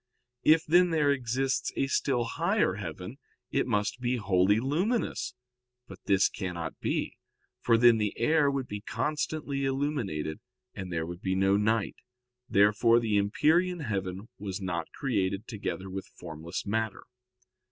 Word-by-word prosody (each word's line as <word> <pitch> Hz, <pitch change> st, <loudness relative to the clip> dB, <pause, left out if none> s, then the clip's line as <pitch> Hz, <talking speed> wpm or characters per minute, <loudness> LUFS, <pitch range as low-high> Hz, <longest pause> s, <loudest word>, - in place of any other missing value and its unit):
If, 160 Hz, +1 st, +5 dB
then, 175 Hz, +3 st, +5 dB
there 155 Hz, -3 st, +3 dB
exists 130 Hz, 0 st, -1 dB
a -, -, +1 dB
still 135 Hz, -2 st, +1 dB
higher 170 Hz, -, +1 dB
heaven, 95 Hz, -, -7 dB, 0.3 s
it 135 Hz, -, +1 dB
must 105 Hz, +1 st, 0 dB
be 125 Hz, 0 st, +1 dB
wholly 100 Hz, -1 st, +3 dB
luminous. 170 Hz, -, -1 dB, 0.5 s
But 95 Hz, -1 st, -11 dB
this 95 Hz, -1 st, +4 dB
cannot 90 Hz, -4 st, -5 dB
be, -, -, -2 dB, 0.4 s
for 115 Hz, -1 st, +3 dB
then 115 Hz, -1 st, +6 dB
the 105 Hz, -1 st, -1 dB
air 145 Hz, +4 st, +3 dB
would 135 Hz, -2 st, -2 dB
be 105 Hz, 0 st, -6 dB
constantly 150 Hz, +2 st, -2 dB
illuminated, 135 Hz, -, -2 dB, 0.3 s
and 95 Hz, -1 st, -6 dB
there 80 Hz, -1 st, -1 dB
would 85 Hz, +1 st, -8 dB
be 95 Hz, 0 st, -1 dB
no 95 Hz, +1 st, +3 dB
night. 105 Hz, +1 st, +1 dB, 0.5 s
Therefore 105 Hz, +4 st, +4 dB
the 110 Hz, -3 st, 0 dB
empyrean 165 Hz, -, +2 dB
heaven 95 Hz, -4 st, -3 dB
was 95 Hz, -1 st, -4 dB
not 85 Hz, -4 st, -3 dB
created 100 Hz, -5 st, -1 dB
together 100 Hz, -4 st, -4 dB
with 95 Hz, 0 st, -6 dB
formless 80 Hz, +4 st, -6 dB
matter. 110 Hz, 0 st, -2 dB
110 Hz, 140 wpm, -29 LUFS, 95-140 Hz, 0.5 s, then